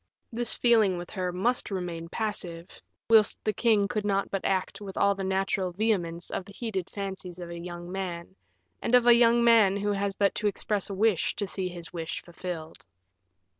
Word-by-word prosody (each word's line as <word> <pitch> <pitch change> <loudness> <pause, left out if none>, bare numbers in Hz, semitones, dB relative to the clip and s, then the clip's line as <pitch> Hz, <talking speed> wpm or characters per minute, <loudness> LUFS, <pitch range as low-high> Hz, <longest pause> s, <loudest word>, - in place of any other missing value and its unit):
This 240 +1 +3
feeling 220 -6 +3
with 175 0 -7
her 185 -2 -2
must 230 +8 0
remain 175 -4 -4
passive, 180 -5 -4 0.3
whilst 220 -2 +5
the 215 - 0
king 215 -4 +3
could 210 0 -2
not 200 -1 0
but 195 - -2
act 195 +2 -1
with 195 -2 -8
all 200 0 +4
the 195 0 -5
natural 190 -1 0
vehemence 175 -5 0
of - - -3
the 200 - -12
heated 195 -6 -4
fancies 190 -3 -6
of 175 -1 -7
a 170 - -6
young 175 0 -7
man, 185 -1 -5 0.5
and 240 - +2
of 245 -1 +5
a 240 - +8
young 235 0 +5
man 220 -4 +5
who 205 +1 -1
has 200 -1 -1
but 200 -1 +2
to 210 - -1
express 205 0 -2
a 195 - -4
wish 210 -3 +2
to 205 - -2
see 190 -1 -2
his 175 -1 -9
wish 165 -2 -4
fulfilled. 170 -2 -7
195 Hz, 195 wpm, -28 LUFS, 180-210 Hz, 0.5 s, a